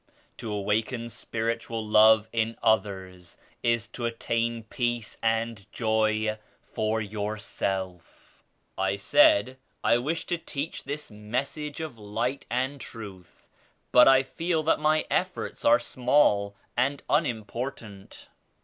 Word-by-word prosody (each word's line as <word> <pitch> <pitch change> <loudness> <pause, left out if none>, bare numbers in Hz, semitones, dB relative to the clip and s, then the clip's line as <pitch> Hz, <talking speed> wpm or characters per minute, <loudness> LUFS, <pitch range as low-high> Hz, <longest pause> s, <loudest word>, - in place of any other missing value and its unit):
To 110 - -5
awaken 110 +4 -1
spiritual 115 0 -3
love 110 0 +6
in 115 0 0
others 95 -5 -1 0.2
is 115 -1 +1
to 120 -2 -3
attain 115 0 -1
peace 120 0 -2
and 115 -2 -1
joy 110 -1 +1 0.2
for 110 +1 -1
yourself." 100 -4 -4 0.4
I 95 0 +1
said 295 - +4 0.2
"I 120 - +4
wish 155 +6 -2
to 175 - -2
teach 150 0 -5
this 145 -1 -5
Message 135 +9 -4
of 150 -8 -6
Light 115 +6 -3
and 130 +3 -1
Truth, 95 -6 -10 0.5
but 125 - +8
I 135 0 +6
feel 165 +3 -1
that 160 - +2
my 155 +1 +2
efforts 185 0 -2
are 295 0 +6
small 105 -6 +2 0.2
and 135 +3 0
unimportant." 115 -6 -3
115 Hz, 115 wpm, -27 LUFS, 105-130 Hz, 0.5 s, but